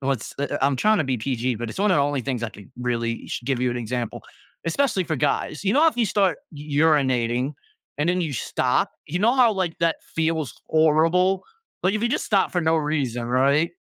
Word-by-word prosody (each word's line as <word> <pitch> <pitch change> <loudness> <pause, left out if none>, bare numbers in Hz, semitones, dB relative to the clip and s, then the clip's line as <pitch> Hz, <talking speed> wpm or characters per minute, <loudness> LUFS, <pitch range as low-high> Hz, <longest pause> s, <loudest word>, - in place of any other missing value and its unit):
what's 135 -4 -2
eh 145 - 0
eh - - -1
I'm 140 -1 +3
tryna 215 0 +3
be 130 -3 -1
PG, 125 0 -1
but 120 0 -5
it's 115 - -8
one 205 0 +2
of 180 - +4
the 140 - +3
only 145 -1 0
things 125 -2 -3
I 115 - -1
could 100 -2 -14
really 115 -1 -2
should 120 - -5
give 130 -3 0
you 125 -1 +1
an 120 - -3
example, 120 0 -4 0.4
especially 190 +1 +1
for 160 -2 -2
guys. 150 +3 -1
You 195 - +2
know, 310 +3 +5
if 310 - -4
you 230 -3 +2
start 195 -4 +1
u 150 +1 -1
urinating 130 -3 +2 0.5
and 150 +3 +1
then 180 +1 +1
you 160 -4 -3
stop, 120 - 0
you 175 - -2
know 230 +6 +3
how, 245 -4 +5
like, 185 -4 -2
that 165 -1 +2 0.2
feels 160 -3 0
horrible? 165 +4 +3 0.4
Like, 185 +3 +2
if 215 - -2
you 235 - +2
just - - -1
stop 200 -3 +2
for 180 - +1
no 160 0 +2
reason, 140 -6 -1
right? 140 +6 +2
150 Hz, 225 wpm, -23 LUFS, 125-180 Hz, 0.5 s, know